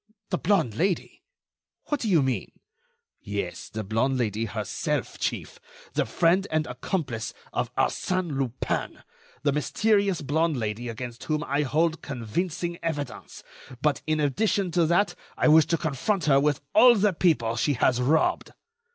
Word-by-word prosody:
"The 180 Hz, -, 0 dB
blonde 180 Hz, -, +2 dB
Lady! 180 Hz, -, -1 dB, 0.7 s
What 295 Hz, -, 0 dB
do 225 Hz, -, -2 dB
you 165 Hz, -7 st, +4 dB
mean?" 130 Hz, -2 st, -2 dB, 0.7 s
"Yes, 100 Hz, -4 st, -5 dB
the 110 Hz, 0 st, -4 dB
blonde 115 Hz, +6 st, 0 dB
Lady 110 Hz, -2 st, -1 dB
herself, 105 Hz, -, -3 dB
chief; -, -, -3 dB, 0.3 s
the -, -, 0 dB
friend 180 Hz, +4 st, +2 dB
and 155 Hz, -1 st, 0 dB
accomplice 130 Hz, -, -3 dB, 0.2 s
of -, -, -1 dB
Arsène 185 Hz, -5 st, 0 dB
Lupin, 130 Hz, -2 st, -2 dB, 0.4 s
the 145 Hz, -, +3 dB
mysterious 200 Hz, -, +1 dB
blonde 155 Hz, +2 st, +1 dB
Lady 115 Hz, +1 st, -3 dB
against 120 Hz, +1 st, -7 dB
whom 155 Hz, -1 st, -1 dB
I 140 Hz, +2 st, 0 dB
hold 160 Hz, +4 st, +1 dB
convincing 170 Hz, -, -3 dB
evidence; 145 Hz, -5 st, -5 dB, 0.4 s
but, 150 Hz, +1 st, +1 dB
in 155 Hz, 0 st, +1 dB
addition 185 Hz, +6 st, +1 dB
to 170 Hz, -1 st, +2 dB
that, 185 Hz, +5 st, +2 dB, 0.2 s
I -, -, +3 dB
wish 155 Hz, 0 st, +6 dB
to 165 Hz, -, +1 dB
confront 160 Hz, +4 st, -1 dB
her 135 Hz, -2 st, +5 dB
with 145 Hz, 0 st, +1 dB
all 245 Hz, -1 st, +8 dB
the 205 Hz, -2 st, +2 dB
people 150 Hz, -10 st, +2 dB
she 125 Hz, +5 st, +1 dB
has 125 Hz, 0 st, +2 dB
robbed." 155 Hz, +5 st, +1 dB
150 Hz, 150 wpm, -26 LUFS, 125-175 Hz, 0.7 s, all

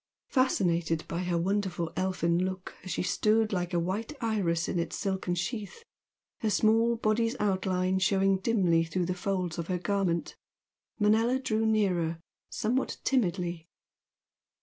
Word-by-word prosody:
Fascinated 170 Hz, -, +1 dB
by 170 Hz, -, -3 dB
her 175 Hz, -1 st, 0 dB
wonderful 185 Hz, -2 st, -1 dB
elfin 180 Hz, -2 st, +1 dB
look 185 Hz, 0 st, -4 dB
as 185 Hz, -, -8 dB
she -, -, -1 dB
stood 215 Hz, +4 st, +2 dB
like 175 Hz, -1 st, -1 dB
a 175 Hz, -, +1 dB
white 200 Hz, -, -2 dB
iris 195 Hz, -8 st, 0 dB
in 175 Hz, -, -1 dB
its 170 Hz, -, -2 dB
silken 190 Hz, -3 st, -1 dB
sheath, 210 Hz, -, -4 dB, 0.6 s
her 220 Hz, -, 0 dB
small 225 Hz, +3 st, +3 dB
body's 230 Hz, +1 st, +1 dB
outline 190 Hz, -2 st, +1 dB
showing 195 Hz, 0 st, +2 dB
dimly 185 Hz, -6 st, +2 dB
through 175 Hz, +2 st, -1 dB
the 180 Hz, -, -1 dB
folds 180 Hz, -2 st, -2 dB
of 170 Hz, -, -3 dB
her 185 Hz, -, 0 dB
garment, 180 Hz, -2 st, -1 dB, 0.6 s
Manella 225 Hz, +4 st, +3 dB
drew 225 Hz, -4 st, 0 dB
nearer, 180 Hz, -7 st, +1 dB, 0.3 s
somewhat 245 Hz, +5 st, -1 dB
timidly. 175 Hz, -9 st, 0 dB
190 Hz, 140 wpm, -29 LUFS, 175-215 Hz, 0.6 s, small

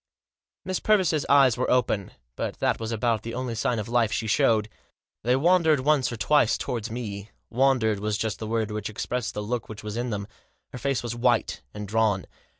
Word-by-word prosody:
Miss 185 Hz, -1 st, -1 dB
Purvis* 200 Hz, -6 st, +3 dB, 0.2 s
eyes 135 Hz, -4 st, +5 dB
were 130 Hz, -, 0 dB
open, 110 Hz, -6 st, +1 dB, 0.2 s
but -, -, -4 dB
that -, -, 0 dB
was 115 Hz, 0 st, -4 dB
about 115 Hz, -1 st, 0 dB
the 115 Hz, +1 st, -6 dB
only 125 Hz, -1 st, -3 dB
sign 115 Hz, +2 st, 0 dB
of 105 Hz, -, -3 dB
life 115 Hz, -2 st, +2 dB
she 110 Hz, -, -1 dB
showed. 110 Hz, 0 st, +3 dB, 0.5 s
They 125 Hz, +3 st, +2 dB
wandered 160 Hz, -1 st, +3 dB
once 140 Hz, -3 st, +2 dB
or 115 Hz, -, -5 dB
twice 145 Hz, -1 st, +3 dB
towards 115 Hz, -2 st, -3 dB
me; 105 Hz, -3 st, -6 dB, 0.2 s
wandered 120 Hz, -4 st, +2 dB
was 105 Hz, 0 st, -1 dB
just 110 Hz, -2 st, -2 dB
the 110 Hz, -, -5 dB
word 110 Hz, -1 st, -1 dB
which 105 Hz, 0 st, -3 dB
expressed 115 Hz, +2 st, -3 dB
the 105 Hz, -, -3 dB
look 115 Hz, +2 st, -3 dB
which 110 Hz, -1 st, -8 dB
was 105 Hz, +1 st, -5 dB
in 120 Hz, +1 st, -2 dB
them. 100 Hz, -2 st, -3 dB, 0.5 s
Her 125 Hz, -, -6 dB
face 135 Hz, -1 st, -1 dB
was 120 Hz, -1 st, -4 dB
white 120 Hz, -1 st, +1 dB
and 105 Hz, 0 st, -7 dB
drawn. 105 Hz, -3 st, +1 dB
115 Hz, 200 wpm, -26 LUFS, 110-125 Hz, 0.5 s, eyes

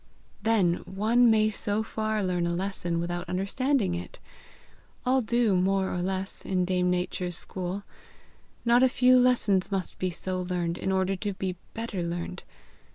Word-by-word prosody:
"Then 200 Hz, -6 st, +3 dB
one 225 Hz, +5 st, +3 dB
may 215 Hz, -1 st, +4 dB
so 205 Hz, +1 st, -1 dB
far 215 Hz, -1 st, -2 dB
learn 180 Hz, -2 st, 0 dB
a 170 Hz, -, -1 dB
lesson 175 Hz, -2 st, -2 dB
without 175 Hz, +1 st, -3 dB
understanding 200 Hz, +3 st, 0 dB
it! 175 Hz, 0 st, -6 dB, 0.9 s
All 260 Hz, +1 st, +3 dB
do, 235 Hz, -3 st, +2 dB
more 190 Hz, +1 st, +1 dB
or 180 Hz, -, -1 dB
less, 190 Hz, +1 st, -2 dB
in 185 Hz, -2 st, 0 dB
Dame 180 Hz, 0 st, +1 dB
Nature's 180 Hz, -1 st, -1 dB
school. 185 Hz, +2 st, -4 dB, 0.8 s
Not 240 Hz, +1 st, +5 dB
a 260 Hz, -, +6 dB
few 255 Hz, 0 st, +5 dB
lessons 220 Hz, -7 st, +2 dB
must 190 Hz, -2 st, -3 dB
be 185 Hz, -, 0 dB
so 185 Hz, +1 st, -3 dB
learned 175 Hz, -1 st, -1 dB
in 190 Hz, -, -1 dB
order 190 Hz, 0 st, +1 dB
to 205 Hz, +1 st, -3 dB
be 190 Hz, -1 st, -3 dB, 0.2 s
better 225 Hz, -5 st, -3 dB
learned. 170 Hz, +1 st, -4 dB
190 Hz, 160 wpm, -27 LUFS, 180-220 Hz, 0.9 s, a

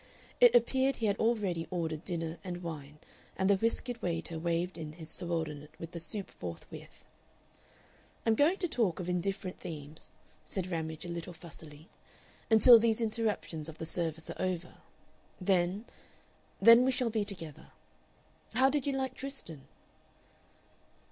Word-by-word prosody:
It -, -, +8 dB
appeared 270 Hz, -, +4 dB
he 225 Hz, -, -2 dB
had 200 Hz, -1 st, +1 dB
already 205 Hz, -8 st, +1 dB
ordered 165 Hz, -3 st, -2 dB
dinner 165 Hz, -2 st, -3 dB
and 180 Hz, -2 st, -5 dB
wine, 150 Hz, -3 st, -6 dB, 0.4 s
and 190 Hz, -, +2 dB
the 200 Hz, -, +6 dB
whiskered 230 Hz, +3 st, -1 dB
waiter 165 Hz, -2 st, -2 dB
waved 170 Hz, +2 st, -1 dB
in 155 Hz, -2 st, -6 dB
his 160 Hz, -1 st, -10 dB
subordinate 160 Hz, -4 st, -3 dB
with 165 Hz, 0 st, -7 dB
the 170 Hz, -, -5 dB
soup 190 Hz, +5 st, -5 dB
forthwith. 85 Hz, -2 st, -9 dB, 1.2 s
"I'm 225 Hz, -, +5 dB
going 300 Hz, -, +4 dB
to 360 Hz, -, -1 dB
talk 220 Hz, -, 0 dB
of 180 Hz, -, -4 dB
indifferent 185 Hz, +1 st, -2 dB
themes," 150 Hz, -1 st, -8 dB, 0.3 s
said 185 Hz, -1 st, -4 dB
Ramage, 160 Hz, -1 st, -3 dB
a -, -, -5 dB
little 170 Hz, +1 st, -5 dB
fussily, 160 Hz, -1 st, -12 dB, 0.6 s
"until 230 Hz, +1 st, +9 dB
these 225 Hz, 0 st, +2 dB
interruptions 215 Hz, -8 st, -1 dB
of 160 Hz, -, -10 dB
the 160 Hz, -, -5 dB
service 165 Hz, -1 st, -2 dB
are -, -, -7 dB
over. 180 Hz, -2 st, -2 dB, 0.7 s
Then 185 Hz, +3 st, +1 dB, 0.7 s
then 230 Hz, +1 st, +9 dB
we 260 Hz, -, +3 dB
shall 250 Hz, -2 st, +1 dB
be 215 Hz, -1 st, +1 dB
together.... 180 Hz, -7 st, -7 dB, 0.9 s
How 265 Hz, +1 st, +5 dB
did 285 Hz, -1 st, 0 dB
you 280 Hz, -, +1 dB
like 265 Hz, -1 st, -1 dB
Tristan?" 255 Hz, -, -8 dB
180 Hz, 150 wpm, -32 LUFS, 165-225 Hz, 1.2 s, until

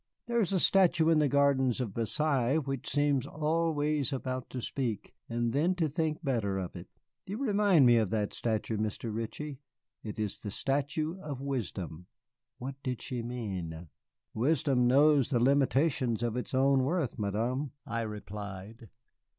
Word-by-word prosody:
"There 235 Hz, -1 st, +1 dB
is 195 Hz, -, +1 dB
a 190 Hz, -, +2 dB
statue 175 Hz, -4 st, +4 dB
in 160 Hz, -2 st, +5 dB
the 150 Hz, -, +3 dB
gardens 135 Hz, -3 st, +2 dB
of 115 Hz, -6 st, -3 dB
Versailles 135 Hz, +3 st, +1 dB
which 135 Hz, -4 st, -3 dB
seems 145 Hz, -3 st, +1 dB
always 155 Hz, -2 st, 0 dB
about 130 Hz, -1 st, -3 dB
to 130 Hz, -, -5 dB
speak, 120 Hz, -4 st, -3 dB, 0.2 s
and 120 Hz, 0 st, -1 dB
then 165 Hz, +7 st, +2 dB
to 165 Hz, -3 st, +1 dB
think 155 Hz, +2 st, -2 dB
better 110 Hz, -9 st, 0 dB
of 90 Hz, -2 st, -5 dB
it. 90 Hz, 0 st, -8 dB, 0.4 s
You 200 Hz, +3 st, -4 dB
remind 205 Hz, -, +4 dB
me 120 Hz, -1 st, +6 dB
of 110 Hz, -4 st, +2 dB
that 105 Hz, -2 st, -1 dB
statue, 110 Hz, -1 st, -1 dB
Mr. 110 Hz, +1 st, -3 dB
Ritchie. 130 Hz, +6 st, -5 dB, 0.4 s
It 105 Hz, -2 st, -7 dB
is 105 Hz, -2 st, -2 dB
the 105 Hz, -, -6 dB
statue 145 Hz, -, -1 dB
of 145 Hz, -4 st, -5 dB
Wisdom." 95 Hz, -, -4 dB, 0.5 s
What 135 Hz, +2 st, -7 dB
did 125 Hz, -4 st, -3 dB
she 125 Hz, -2 st, -3 dB
mean? 95 Hz, -9 st, -5 dB, 0.4 s
"Wisdom 135 Hz, 0 st, +2 dB
knows 140 Hz, 0 st, +5 dB
the 125 Hz, -4 st, +2 dB
limitations 135 Hz, -2 st, +2 dB
of 120 Hz, -1 st, -1 dB
its 125 Hz, +1 st, -3 dB
own 135 Hz, 0 st, +4 dB
worth, 150 Hz, -4 st, -1 dB
Madame," 115 Hz, +8 st, -1 dB, 0.2 s
I 115 Hz, -, -2 dB
replied. 105 Hz, +1 st, -7 dB
130 Hz, 160 wpm, -30 LUFS, 115-150 Hz, 0.5 s, me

